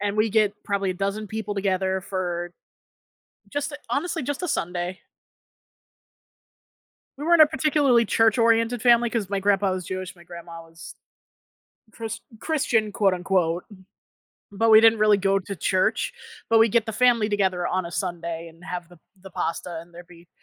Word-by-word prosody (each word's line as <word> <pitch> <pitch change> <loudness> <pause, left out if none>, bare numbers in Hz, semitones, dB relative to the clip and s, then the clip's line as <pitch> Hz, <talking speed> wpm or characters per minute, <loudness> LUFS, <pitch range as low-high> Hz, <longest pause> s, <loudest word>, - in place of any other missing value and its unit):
and 205 0 -2
we 215 0 +2
get 215 -2 +3
probably 200 -2 -1
a - - -3
dozen 200 +3 -3
people 215 -1 -5
together 190 -1 0
for 175 -2 -4 1.0
just 290 +1 -2
a - - -5
honestly 325 +1 -1
just 290 +6 -4
a 360 - -2
Sunday. 180 - -3 2.2
We 295 - -5
weren't 340 -1 +6
a - - +8
particularly 280 -5 +2
church-oriented 230 +2 +2
family 235 0 +4
'cause 215 -5 -2
my 200 -1 -2
grandpa 195 -1 +2
was 185 -1 -4
Jewish, 185 +1 -5
my 175 - -17
grandma 170 -1 -10
was 165 -1 -12 1.0
Chris 225 -1 -6 0.2
Christian, 235 -9 0
quote 195 -2 +2
unquote. 180 -1 0 0.9
But 225 +3 +2
we 220 0 +9
didn't 225 -1 +5
really 210 -1 +5
go 195 0 +1
to 195 +1 -7
church. 185 +4 0 0.4
But 225 - +4
we'd 225 - +5
get 230 +1 +2
the 220 - -4
family 235 -1 +3
together 190 -4 0
on 185 -1 -1
a 170 - -7
Sunday 170 -2 -4
and 165 +1 -19
have 175 -2 -6
the 175 -2 -18 0.2
the 190 0 -12
pasta 165 0 -4
and 170 +1 -16
there'd 175 0 -12
be 170 -1 -18
200 Hz, 165 wpm, -24 LUFS, 180-225 Hz, 2.2 s, we